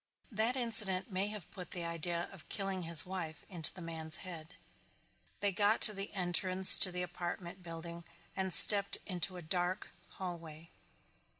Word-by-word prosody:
That 225 +4 -1
incident 215 -6 -4
may 190 +2 -3
have 210 -4 -10
put 180 -3 -12
the 175 -2 -6
idea 170 +1 -6
of 195 -5 -16
killing 195 -2 -6
his 165 -1 +5
wife 175 -4 -7
into 170 -5 -2
the 180 - -11
man's 160 -1 -6
head. 165 -2 -10 0.9
They 200 0 0
got 205 +3 -1
to 215 - +4
the 195 0 -7
entrance 185 +1 +3
to 185 - +4
the 180 0 -5
apartment 175 +1 -9
building 170 0 -11 0.3
and 190 -1 -5
stepped 200 +2 +9
into 180 -1 -4
a 175 - -11
dark 180 +4 -5 0.3
hallway. 165 -3 -10
180 Hz, 160 wpm, -31 LUFS, 170-195 Hz, 0.9 s, stepped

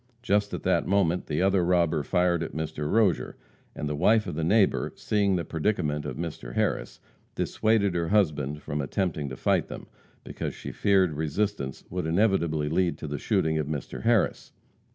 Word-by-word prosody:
Just 105 -2 +1
at - - -7
that - - +1
moment 90 -3 +1
the 75 +5 0
other 95 -1 +3
robber 85 -3 +2
fired 90 +2 +1
at 80 - -5
Mr. 75 -1 -3
Rozier, 105 -6 +2 0.4
and 75 - -3
the 75 - -2
wife 105 +8 +3
of - - -4
the 80 +2 -2
neighbor, 100 +4 +2
seeing 100 -2 +1
the 85 - -2
predicament 80 -4 -1
of - - -5
Mr. 75 -8 -6
Harris, - - -1 0.4
dissuaded 110 -3 +1
her 85 -1 -1
husband 75 -7 +1
from 75 +1 -3
attempting 75 -1 -2
to 65 - -7
fight - - +1
them, - - -8 0.4
because - - -5
she - - -7
feared 95 -5 +2
resistance 80 -1 -2
would 90 -2 -2
inevitably 85 -5 +1
lead 85 0 +1
to - - -7
the 70 -1 -4
shooting 80 0 +1
of 75 - -2
Mr. 75 -4 -5
Harris. 115 -3 +1
85 Hz, 175 wpm, -27 LUFS, 75-100 Hz, 0.4 s, other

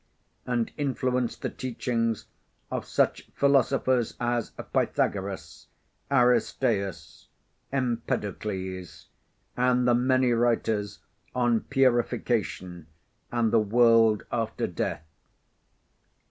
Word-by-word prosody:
and 120 -2 0
influenced 130 -4 -1
the - - 0
teachings 115 -3 -2 0.5
of - - -3
such - - 0
philosophers 130 -3 +2
as 120 -1 -1 0.2
Pythagoras, 95 -1 -1 0.4
Aristeas, 120 -6 +1 0.4
Empedocles, 105 -7 -3 0.5
and 125 0 +2
the 120 - +5
many 130 +1 +3
writers 115 -3 0 0.3
on 120 -2 +2
purification 120 - 0 0.4
and 115 -2 +1
the 115 - +6
world 115 0 +4
after 115 -2 -1
death. 75 - -3
120 Hz, 80 wpm, -27 LUFS, 110-125 Hz, 0.5 s, the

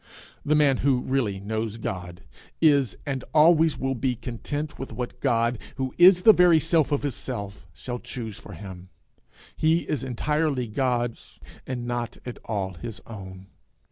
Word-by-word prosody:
The 150 +1 +2
man 145 -3 +4
who 130 -2 +2
really 120 -8 0
knows 110 +2 -3
God, 90 -5 -6 0.4
is, 140 -7 +3
and 135 -2 -3
always 160 0 +5
will 135 0 -1
be, 125 0 -1
content 140 +5 -5
with 135 - -6
what 120 +2 -5
God, 115 -3 +1 0.2
who 130 -1 -3
is 180 0 +8
the 220 - +9
very 175 -3 +6
self 160 -1 +2
of 145 - 0
his 145 -3 -1
self, 100 -6 -6
shall 120 +10 -6
choose 110 -5 -6
for 100 - -11
him; 95 0 -10 0.7
he 160 +2 +2
is 145 -5 -2
entirely 140 +1 0
God's, 120 +1 -2 0.3
and 125 -2 -4
not 120 -1 -3
at 125 - -7
all 100 -4 -2
his 110 +5 -7
own. 95 -4 -9
125 Hz, 160 wpm, -25 LUFS, 110-145 Hz, 0.7 s, the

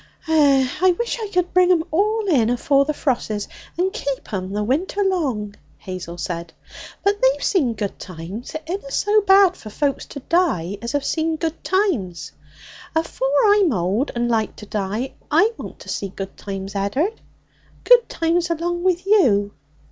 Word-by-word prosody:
'Eh! 285 -4 +4
I 375 - +6
wish 475 0 -2
I 430 - -3
could 360 -3 -1
bring 365 0 +5
'em 335 -3 +3
all 425 +6 +1
in 250 - +3
afore 275 +3 +2
the 305 - 0
frosses, 220 -7 -1 0.3
and 375 +3 0
keep 280 - -4
'em 185 -1 -3
the 210 +1 -1
winter 330 - 0
long,' 270 - -1 0.2
Hazel 180 -2 -7
said. 170 0 -5 0.5
'But 405 +1 +1
they've - - +3
seen 275 - +1
good 205 -1 -4
times. 185 - -8
It 315 - -4
inna 345 -3 -5
so 415 +9 +2
bad 385 -2 +5
for 215 - -10
folks 280 +5 -1
to 280 - -8
die 205 - 0
as 235 +3 -4
have 285 -1 0
seen 320 0 0
good 320 0 -4
times. 195 - -1 0.6
Afore 320 -4 -1 0.2
I'm 400 -6 +3
old 200 +6 0
and 240 0 0
like 225 -2 0
to 210 - -10
die, 210 +5 -3 0.2
I 435 +2 +4
want - - -8
to - - -11
see 200 - -3
good 195 +1 -7
times, 195 -1 -6
Ed'ard 265 - -1 0.6
good 485 -1 +6
times 335 +1 0
along 345 +1 -2
with 370 0 +1
you.' 230 - +3
285 Hz, 170 wpm, -21 LUFS, -, 0.6 s, I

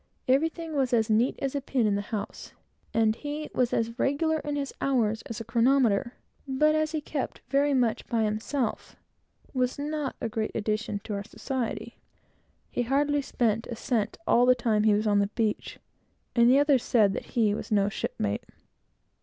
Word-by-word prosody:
Everything 320 +5 +1
was 265 -4 0
as 225 -1 +2
neat 230 +5 +3
as 270 - -1
a 280 - -1
pin 255 -3 0
in 210 - +2
the 200 - 0
house, 210 0 -6 0.4
and 220 -1 +2
he 295 +1 -5
was 250 -2 +1
as 230 +1 -1
regular 315 +3 +1
in 295 -1 -3
his 280 -1 -3
hours 225 -5 +1
as 230 - -5
a - - -4
chronometer, 235 0 +2 0.3
but 300 +3 +3
as 310 0 +1
he 315 - -1
kept 290 -2 -4
very 285 +1 +3
much 240 -4 +1
by 230 -2 +1
himself, 220 +4 -2 0.6
was 255 -1 0
not 295 -1 -3
a - - -2
great 220 -1 -3
addition 215 0 -1
to 215 - -5
our 200 0 -3
society. 250 +2 -4 0.7
He - - -1
hardly 285 +4 +1
spent 230 -4 0
a 240 - -5
cent 220 -2 -1
all 245 -4 +4
the 255 - +6
time 220 -3 +1
he 215 -1 +5
was 210 +1 0
on 205 -1 +3
the 200 - +2
beach, 215 0 -2 0.6
and 235 0 +6
the 260 - +6
others 285 -3 +4
said 210 -6 +3
he 220 -5 0
was 210 - -5
no 200 -2 +3
shipmate. 105 - -3
240 Hz, 180 wpm, -27 LUFS, 215-275 Hz, 0.7 s, the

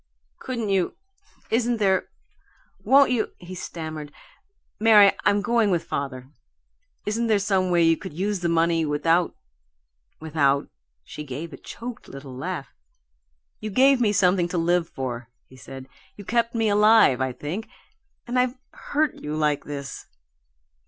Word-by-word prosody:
"Couldn't 235 -5 -4
you 190 -2 0 0.6
Isn't 235 +1 +1
there 190 -3 +1 0.8
Won't 275 0 +5
you 230 -4 -1
" - - -41
he - - -6
stammered. 155 -4 -6 0.7
"Mary, 210 -2 +7
I'm 205 0 +3
going 235 -2 +2
with 175 -3 +1
father. 130 -1 -5 0.7
Isn't 230 +3 -1
there 215 -2 +3
some 190 -2 +1
way 175 -1 +3
you 165 0 +5
could 190 - -8
use 200 +3 -1
the 175 -1 -1
money 165 0 +2
without 165 +3 +1 0.8
without 145 -3 +1 0.2
" - - -53
She 150 - -6
gave 150 +4 -7
a - - -8
choked 240 0 -9
little 135 -1 -10
laugh. 130 - -5 0.9
"You 215 - -5
gave 260 +4 +4
me 215 -3 +3
something 185 -3 +3
to 175 - -3
live 170 0 +1
for," 120 -3 -5 0.2
he 130 - -18
said. 130 0 -10 0.3
"You 205 - -11
kept 235 +3 0
me 225 -1 +1
alive, 210 - +5
I 130 0 0
think 160 - -6 0.6
and 245 +1 0
I've 250 0 0
hurt 300 -1 -1
you 150 +1 -4
like 150 -2 0
this!" 140 -1 -7
180 Hz, 150 wpm, -24 LUFS, 150-220 Hz, 0.9 s, Mary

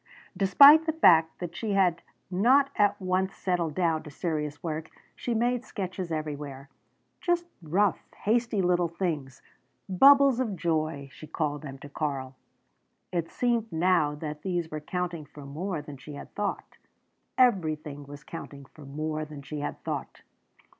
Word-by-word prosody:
Despite 280 - +8
the 320 - +1
fact 165 - +5
that 175 -1 -6
she 210 +2 -2
had 180 -4 +2 0.3
not 260 +9 +4
at 205 -2 +2
once 190 0 0
settled 175 -5 -1
down 165 -3 +1
to 155 - -10
serious 150 -1 -3
work, 160 -1 -4 0.3
she 240 - -3
made 245 +2 +1
sketches 185 -6 -5
everywhere, 145 -3 -5 0.5
just 350 -1 0 0.2
rough, 185 +5 +1 0.2
hasty 225 -2 +1
little 175 -1 +2
things 160 -7 -4 0.4
"bubbles 275 +6 +6
of 225 -6 -1
joy" 155 -4 -1
she 155 - -12
called 150 -1 -2
them 135 -3 -8
to 140 - -11
Karl. 140 -3 -4 0.8
It 170 -2 -1
seemed 235 -3 0
now 160 -3 +2
that 150 0 -6
these 175 -3 -2
were 155 - -3
counting 175 -1 -3
for 145 0 -12
more 155 +3 -4
than 145 -2 -9
she 145 +3 -10
had - - -10
thought. 205 -1 -4 0.6
Everything 155 - +1
was 145 +1 -10
counting 140 -4 -9
for 145 +2 -15
more 155 +2 -3
than 150 -2 -9
she 150 +1 -6
had 145 - -5
thought! - - -5
165 Hz, 155 wpm, -28 LUFS, 150-195 Hz, 0.8 s, Despite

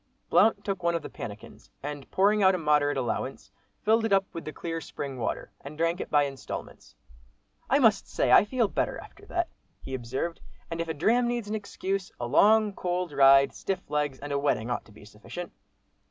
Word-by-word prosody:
Blount 210 -2 +4
took 195 -3 -2
one 170 0 +1
of 165 - -2
the - - -8
pannikins, 105 0 -9
and 145 -1 -6
pouring 205 +2 +3
out 190 -1 +5
a - - -1
moderate 150 -3 +2
allowance, 130 -3 -3 0.3
filled 220 +1 +3
it 225 - -1
up 195 0 +4
with 165 - -6
the 155 - -4
clear 165 +1 -5
spring 140 -4 -6
water, 110 - -3
and 145 +2 -9
drank 165 +2 0
it - - -6
by 145 -1 +4
instalments. 135 -1 -7 0.7
"I 270 - +5
must 225 -8 +3
say - - 0
I - - +8
feel 235 +1 +1
better - - -1
after 410 +1 -13
that," 345 -1 -1 0.3
he 135 - -8
observed, 130 +7 -3 0.3
"and 165 0 -2
if 165 - -3
a 160 - -3
dram 235 +11 +3
needs 240 -3 -2
an 210 - -4
excuse, 195 -2 -3
a 120 - -2
long, 210 - +4
cold 180 -2 -2
ride, 135 -1 +6
stiff 190 -5 -4
legs, 145 -2 0
and 145 +1 -7
a 140 - +1
wetting 125 -5 0
ought 120 - -2
to - - -18
be 105 0 -15
sufficient." 110 +12 -8
165 Hz, 205 wpm, -28 LUFS, 140-200 Hz, 0.7 s, I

